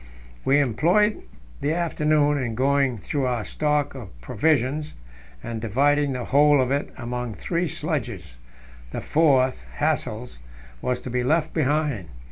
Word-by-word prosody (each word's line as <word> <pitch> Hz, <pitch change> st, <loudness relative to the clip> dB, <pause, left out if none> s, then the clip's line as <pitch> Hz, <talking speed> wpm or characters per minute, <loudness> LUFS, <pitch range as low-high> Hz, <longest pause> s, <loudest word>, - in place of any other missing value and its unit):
We 140 Hz, +2 st, +4 dB
employed 170 Hz, -, +2 dB, 0.4 s
the 150 Hz, +3 st, 0 dB
afternoon 150 Hz, -3 st, +2 dB
in 120 Hz, -3 st, -3 dB
going 135 Hz, 0 st, +2 dB
through 135 Hz, +5 st, -2 dB
our 120 Hz, -4 st, -1 dB
stock 150 Hz, +6 st, 0 dB
of 110 Hz, -, -10 dB
provisions, 150 Hz, -, 0 dB, 0.5 s
and 115 Hz, -1 st, -5 dB
dividing 140 Hz, +5 st, +2 dB
the 125 Hz, -1 st, -4 dB
whole 145 Hz, +1 st, +5 dB
of 130 Hz, 0 st, +1 dB
it 140 Hz, +1 st, 0 dB
among 120 Hz, -1 st, -4 dB
three 175 Hz, 0 st, -1 dB
sledges; -, -, -4 dB, 0.5 s
the -, -, -5 dB
fourth 135 Hz, -5 st, +3 dB
Hassel's 125 Hz, -, -2 dB, 0.4 s
was 125 Hz, -1 st, -1 dB
to 130 Hz, -, -6 dB
be 125 Hz, 0 st, 0 dB
left 155 Hz, +4 st, +1 dB
behind. 145 Hz, -, 0 dB
140 Hz, 135 wpm, -24 LUFS, 125-150 Hz, 0.5 s, whole